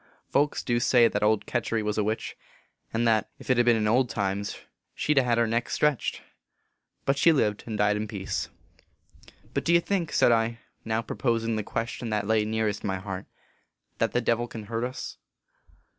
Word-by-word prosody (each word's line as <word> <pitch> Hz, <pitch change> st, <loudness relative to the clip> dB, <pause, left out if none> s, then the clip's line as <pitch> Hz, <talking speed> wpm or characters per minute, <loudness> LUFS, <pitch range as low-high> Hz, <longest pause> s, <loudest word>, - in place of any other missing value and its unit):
Folks 145 Hz, +1 st, +1 dB
du 120 Hz, -1 st, +1 dB
say 120 Hz, 0 st, +5 dB
that -, -, -2 dB
old 105 Hz, -1 st, +2 dB
Ketury 115 Hz, -2 st, -1 dB
was 105 Hz, 0 st, -1 dB
a -, -, +2 dB
witch, 110 Hz, +2 st, -2 dB, 0.6 s
and 115 Hz, +1 st, +1 dB
that, 110 Hz, -2 st, +2 dB
ef -, -, -12 dB
t 120 Hz, -, +4 dB
ben 120 Hz, -1 st, +4 dB
in 110 Hz, -1 st, +1 dB
old 125 Hz, +3 st, +3 dB
times, 100 Hz, -1 st, -2 dB, 0.4 s
she 150 Hz, -, +1 dB
d 140 Hz, -, +5 dB
a -, -, -2 dB
hed 120 Hz, -2 st, +1 dB
her 120 Hz, -, +4 dB
neck 115 Hz, +1 st, -1 dB
stretched; 150 Hz, -4 st, 0 dB, 0.8 s
but 135 Hz, 0 st, +1 dB
she 170 Hz, -, +6 dB
lived 105 Hz, -9 st, +1 dB
and 110 Hz, -2 st, -3 dB
died 105 Hz, 0 st, +3 dB
in 105 Hz, +1 st, -2 dB
peace." 100 Hz, -1 st, -3 dB, 0.8 s
44 -, -, -18 dB, 0.2 s
But 140 Hz, -, -1 dB
do 170 Hz, -, +1 dB
you -, -, +7 dB
think," 170 Hz, -2 st, -1 dB
said -, -, +4 dB
I, 115 Hz, 0 st, +2 dB, 0.3 s
now 110 Hz, +1 st, -1 dB
proposing 115 Hz, 0 st, -1 dB
the 110 Hz, -, -1 dB
question 115 Hz, +2 st, -4 dB
that 105 Hz, -1 st, -1 dB
lay 110 Hz, 0 st, +2 dB
nearest 110 Hz, -2 st, -1 dB
my 95 Hz, -2 st, -1 dB
heart, 95 Hz, 0 st, -6 dB, 0.4 s
" -, -, -49 dB
that -, -, +2 dB
the -, -, +1 dB
Devil 120 Hz, +1 st, +1 dB
can 115 Hz, -2 st, -8 dB
hurt 115 Hz, +2 st, -3 dB
us 125 Hz, +1 st, -6 dB
115 Hz, 205 wpm, -27 LUFS, 105-120 Hz, 0.8 s, you